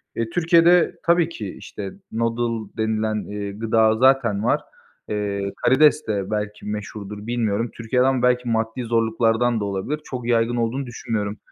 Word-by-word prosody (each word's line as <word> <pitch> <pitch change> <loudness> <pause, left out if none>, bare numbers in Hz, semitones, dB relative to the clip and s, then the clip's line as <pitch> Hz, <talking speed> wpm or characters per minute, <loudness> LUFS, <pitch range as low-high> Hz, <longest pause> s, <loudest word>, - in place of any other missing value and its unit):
Eee, 115 -1 -2
Türkiye'de 170 +3 +4
tabii 170 -1 +3
ki 105 - -7
işte, 100 -2 -7 0.2
noodle 115 -1 -1
denilen, 110 0 0
eee, 100 -1 -4
gıda 110 +1 +2
zaten 120 -5 +3
var. - - +2 0.5
Eee, 100 -1 -2
karides 150 +3 +4
de 100 -1 -2
belki 105 0 -3
meşhurdur, 105 0 -6
bilmiyorum. 115 -1 -1
Türkiye'den 125 +3 +1
belki 125 -1 +2
maddi 110 +2 -1
zorluklardan 115 0 +1
da 105 - -2
olabilir, 100 +10 -3
çok 125 -2 -6
yaygın 120 0 +2
olduğunu 120 +4 -1
düşünmüyorum. 110 -3 -3
115 Hz, 140 wpm, -22 LUFS, 105-125 Hz, 0.5 s, Türkiye'de